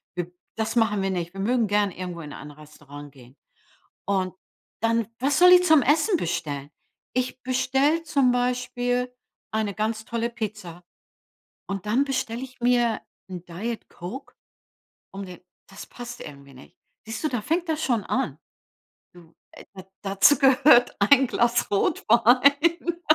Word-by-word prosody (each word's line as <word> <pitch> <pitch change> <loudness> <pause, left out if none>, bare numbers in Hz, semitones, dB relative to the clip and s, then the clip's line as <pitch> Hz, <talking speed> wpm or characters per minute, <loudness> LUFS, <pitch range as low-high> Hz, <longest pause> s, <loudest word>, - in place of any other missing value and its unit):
wir 175 0 -4 0.2
das 220 +1 -2
machen 210 -4 +2
wir 195 - -1
nicht. 175 0 -4
Wir 195 - -9
mögen 230 +2 +1
gern 205 -1 +1
irgendwo 180 -2 -7
in 150 -2 -9
ein 150 - -10
Restaurant 145 -1 -13
gehen. 130 0 -18 0.7
Und 185 -2 -1 0.5
dann, 230 -1 +1
was 280 +5 +1
soll 360 0 +8
ich 360 0 +7
zum 315 -5 +5
Essen 315 - +2
bestellen? 145 - -4 0.4
Ich 255 0 -2
bestelle 270 +5 +1
zum 280 -5 +2
Beispiel 245 0 -1 0.4
eine 215 -2 -1
ganz 220 +1 -3
tolle 235 0 -2
Pizza 210 -7 -7 0.8
und 195 0 -5
dann 235 +6 +2
bestelle 255 -3 -3
ich 260 -1 -10
mir 240 -2 +2 0.3
'n 180 -2 -7
Diet-Coke, 215 +4 -7 0.8
um 195 0 -6
den 180 -2 -11 0.3
das 195 - -11
passt 240 0 -9
irgendwie 140 -2 -11
nicht. 130 - -16 0.3
Siehst 225 +7 -7
du, - - +2
da 245 -6 -2
fängt 335 +6 -1
das 315 0 -1
schon 230 -7 0
an. 145 +1 -2 0.8
Du, 170 -2 -18 0.4
da 190 -1 -10 0.2
dazu 195 +8 +4
gehört 270 -2 +5
ein 265 +5 +5
Glas 235 -1 +1
Rotwein. 280 - +2
230 Hz, 145 wpm, -24 LUFS, 185-255 Hz, 0.8 s, soll